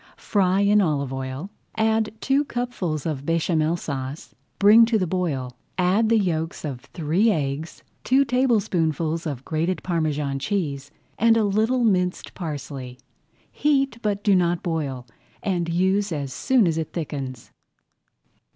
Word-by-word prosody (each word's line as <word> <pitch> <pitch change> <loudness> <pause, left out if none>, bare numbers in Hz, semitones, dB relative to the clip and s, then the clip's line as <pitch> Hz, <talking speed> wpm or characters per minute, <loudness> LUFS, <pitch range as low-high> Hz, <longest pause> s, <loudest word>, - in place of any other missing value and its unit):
Fry 195 -1 +1
in 205 +1 +4
olive 140 -7 0
oil, 135 +8 -5 0.3
add 220 0 +2
two 275 +2 +2
cupfuls 240 - -3
of 150 -5 -2
Béchamel 165 +1 +1
Sauce, 140 -2 -6 0.2
bring 210 +3 +7
to 225 -1 +2
the 185 - 0
boil, 150 -9 -2 0.2
add 190 +5 +3
the 230 - +4
yolks 165 -5 -1
of 135 -4 -5
three 175 +7 +1
eggs, 150 -3 -2 0.2
two 270 +2 +3
tablespoonfuls 175 - +1
of 135 -3 -5
grated 165 +4 -1
Parmesan 150 -5 -1
cheese, 145 -6 -2 0.3
and 230 +1 +5
a 225 - +3
little 220 +5 +1
minced 180 -5 0
parsley. 140 -6 -6 0.5
Heat, 275 -5 +1
but 205 -1 -1
do 205 - +4
not 175 -2 +2
boil, 145 -7 -3 0.4
and 175 -4 -1
use 190 +3 +1
as 140 -4 -3
soon 260 - +3
as 165 -2 +1
it 160 - -5
thickens. 135 -7 -5
175 Hz, 140 wpm, -24 LUFS, 150-210 Hz, 0.5 s, bring